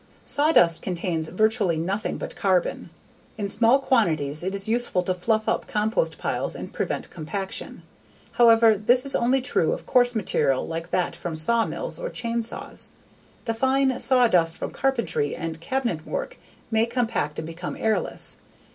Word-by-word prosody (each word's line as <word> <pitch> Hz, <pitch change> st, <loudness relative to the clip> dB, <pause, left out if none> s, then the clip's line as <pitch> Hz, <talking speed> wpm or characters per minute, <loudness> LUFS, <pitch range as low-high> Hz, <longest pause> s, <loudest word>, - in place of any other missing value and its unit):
_ -, -, -31 dB, 0.2 s
Sawdust 285 Hz, -, +4 dB
contains 170 Hz, -3 st, -2 dB
virtually 215 Hz, -3 st, +1 dB
nothing 190 Hz, +6 st, -2 dB
but -, -, -7 dB
carbon. 185 Hz, -3 st, 0 dB, 0.5 s
In 205 Hz, -2 st, -2 dB
small 230 Hz, +5 st, +4 dB
quantities 160 Hz, -, +1 dB
it 190 Hz, +2 st, -3 dB
is 195 Hz, +1 st, -1 dB
useful 230 Hz, -5 st, +1 dB
to 185 Hz, -, 0 dB
fluff 220 Hz, +4 st, -1 dB
up -, -, -1 dB
compost 220 Hz, -, -1 dB
piles -, -, -2 dB
and -, -, -8 dB
prevent -, -, -3 dB
compaction. 190 Hz, +4 st, -5 dB, 0.5 s
However 230 Hz, -2 st, +5 dB
this 245 Hz, +6 st, +5 dB
is 275 Hz, -, +1 dB
only 255 Hz, +3 st, +2 dB
true 250 Hz, -10 st, +1 dB
of -, -, -7 dB
coarse 245 Hz, -1 st, +2 dB
material 145 Hz, -10 st, 0 dB
like 165 Hz, +1 st, -5 dB
that 180 Hz, -1 st, -1 dB
from 170 Hz, -2 st, -5 dB
sawmills 230 Hz, -, 0 dB
or -, -, -4 dB
chain 235 Hz, -, -2 dB
saws. 230 Hz, -, -2 dB, 0.6 s
The 230 Hz, -, -1 dB
fine 265 Hz, +2 st, +1 dB
saw 250 Hz, -2 st, +4 dB
dust 165 Hz, -5 st, +2 dB
from -, -, -5 dB
carpentry 235 Hz, -, -1 dB
and 165 Hz, -1 st, -6 dB
cabinet 235 Hz, -7 st, -2 dB
work -, -, -5 dB, 0.3 s
may 225 Hz, +1 st, +2 dB
compact 230 Hz, -, -2 dB
and 160 Hz, -, -4 dB
become 165 Hz, +2 st, -6 dB
airless. 220 Hz, -1 st, 0 dB
215 Hz, 160 wpm, -24 LUFS, 170-245 Hz, 0.6 s, However